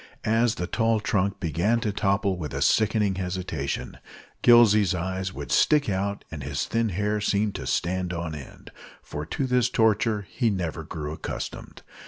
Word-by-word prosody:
As 115 +1 +2
the 90 - -3
tall 115 +3 +1
trunk 100 -2 0
began 95 +7 +1
to 105 - 0
topple 100 0 +1
with 80 -5 -6
a - - -2
sickening 110 -2 +2
hesitation, 90 -6 -4 0.4
Gillsey's 105 -6 +6
eyes 95 +2 -3
would - - -7
stick 150 -2 +4
out 100 +1 -2
and 80 -3 -6
his - - -2
thin 115 -1 0
hair 105 +3 -1
seem 105 0 +1
to - - -6
stand 90 0 -1
on 85 -2 -4
end, 75 -3 -10 0.3
for 75 +1 -6
to 135 - -2
this 125 -2 +2
torture 110 -2 +2
he 120 -3 0
never 85 -5 -3
grew 75 -1 -5
accustomed. - - -7
100 Hz, 165 wpm, -26 LUFS, 90-110 Hz, 0.4 s, Gillsey's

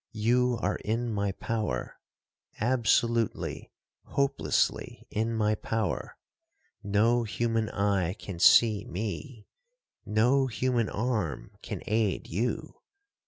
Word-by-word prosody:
You 120 +2 +2
are - - +1
in 115 +2 -2
my 100 -1 0
power,—absolutely, 115 - -2 0.4
hopelessly 140 0 0
in 110 +2 0
my 110 -1 +1
power. 110 -2 -3 0.6
No 110 +4 +2
human 115 +1 -1
eye 100 -3 0
can 95 -4 -8
see 110 0 +6
me—no 130 - -2
human 125 -2 0
arm 105 - -2
can - - -6
aid 110 -2 0
you. 125 - -3
115 Hz, 90 wpm, -28 LUFS, 105-120 Hz, 0.6 s, see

